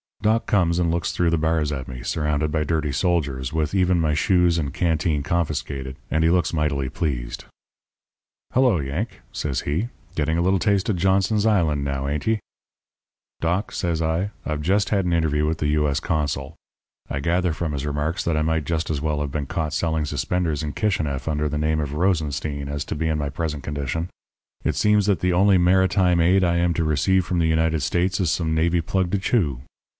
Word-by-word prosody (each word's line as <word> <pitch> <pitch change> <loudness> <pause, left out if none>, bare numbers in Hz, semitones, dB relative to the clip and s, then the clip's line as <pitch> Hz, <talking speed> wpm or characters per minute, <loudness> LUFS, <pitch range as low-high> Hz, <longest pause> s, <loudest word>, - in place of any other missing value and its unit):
"Doc 110 +2 +2
comes 85 -4 +2
and 85 -2 +1
looks 85 0 -1
through 85 -2 +1
the 85 - +2
bars 80 -1 +1
at 65 -2 -4
me, 60 -2 -8
surrounded 75 -1 -1
by 75 0 0
dirty 75 -1 -1
soldiers, 70 -4 -1
with 80 0 -1
even 90 -2 +3
my 80 -2 +1
shoes 90 +1 +3
and 70 -4 -3
canteen 80 -3 0
confiscated, 70 -5 -2 0.2
and 80 +1 +2
he 80 - +4
looks 90 0 +2
mightily 70 -4 0
pleased. 65 -7 -3 1.1
"'Hello, 125 -8 +4
Yank,' 75 - -4
says 70 -4 -2
he, 85 +12 -2 0.3
'getting 80 +2 0
a - - +2
little 95 +2 +2
taste 100 +1 +1
of 105 - +2
Johnson's 95 +4 +2
Island, 80 -10 +2
now, 70 -1 -2
ain't 75 +5 -3
ye?' 110 -1 +2 1.0
"'Doc,' 90 +5 0
says 85 -3 -1
I, 80 +4 0 0.2
'I've 75 -1 -2
just 100 +6 +1
had 100 -3 +1
an 90 - 0
interview 75 -2 +1
with 80 +1 0
the 75 -2 -1
U.S. 75 -1 +1
consul. 75 -2 -2 0.5
I 70 - -2
gather 85 +3 +1
from 80 0 -3
his 70 -1 -3
remarks 75 +6 -2
that 85 -2 0
I 75 - +1
might 80 -1 0
just 80 -1 -1
as 70 -3 -2
well 75 -1 -1
have 70 -2 -3
been 70 -1 -3
caught 80 -1 -2
selling 80 -2 0
suspenders 85 -1 -1
in 75 -1 -3
Kishineff 80 -11 -1
under 75 -1 0
the 75 +1 -2
name 80 +1 +1
of 75 -2 -3
Rosenstein 75 -4 -1
as 70 0 -3
to - - -4
be 80 +1 -1
in 80 -1 0
my 75 -1 -2
present 75 -1 -3
condition. 75 +3 -3 0.6
It - - 0
seems 105 -1 +3
that 100 -3 +2
the 90 0 +1
only 95 +2 +5
maritime 90 0 +3
aid 95 +3 +4
I 85 -1 +2
am 85 -1 +1
to 85 - +1
receive 80 +5 +2
from 90 -1 -1
the 80 - +2
United 80 -1 +1
States 90 +8 0
is 90 -5 +1
some 80 -2 0
navy 85 +2 +2
plug 90 +1 -1
to 100 - +2
chew. 85 - 0
80 Hz, 205 wpm, -23 LUFS, 75-90 Hz, 1.1 s, only